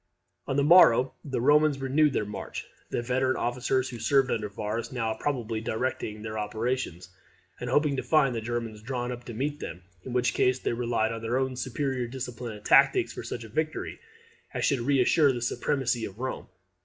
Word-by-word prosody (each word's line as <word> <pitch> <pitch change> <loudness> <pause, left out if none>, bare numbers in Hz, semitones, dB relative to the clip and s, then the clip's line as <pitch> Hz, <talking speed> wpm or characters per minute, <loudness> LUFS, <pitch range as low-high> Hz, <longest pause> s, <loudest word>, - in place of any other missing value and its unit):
On 135 - -1
the 140 - +3
morrow 135 -6 +6
the 135 -5 -3
Romans 150 +3 +4
renewed 140 +2 +2
their 105 - 0
march; 105 0 -6 0.2
the 120 - -2
veteran 130 +1 +1
officers 125 +2 0
who 120 - -7
served 135 +1 +3
under 105 -2 -1
Varus 105 +5 -4
now 115 -3 -1
probably 115 -5 -2
directing 110 -2 -3
the 110 -1 -5
operations, 110 -4 -3 0.5
and 125 - -4
hoping 145 +2 +2
to - - 0
find 140 -5 +3
the 115 - -3
Germans 115 -2 -4
drawn 125 +1 -3
up 120 0 -7
to 120 - -7
meet 145 +5 -2
them; 90 - -7 0.2
in 130 - -7
which 125 0 +1
case 125 0 +2
they - - -2
relied 115 -2 0
on 115 0 -5
their 115 +2 0
own 130 -1 -1
superior 130 0 -2
discipline 120 -2 -6
and 105 - -12
tactics - - +5
for - - -6
such 120 - -5
a 110 - -10
victory 155 +7 -3 0.6
as - - 0
should 140 - +2
reassure 140 +3 +4
the 125 - -3
supremacy 125 0 0
of 95 - -9
Rome. 130 +2 -4
125 Hz, 190 wpm, -28 LUFS, 115-135 Hz, 0.6 s, morrow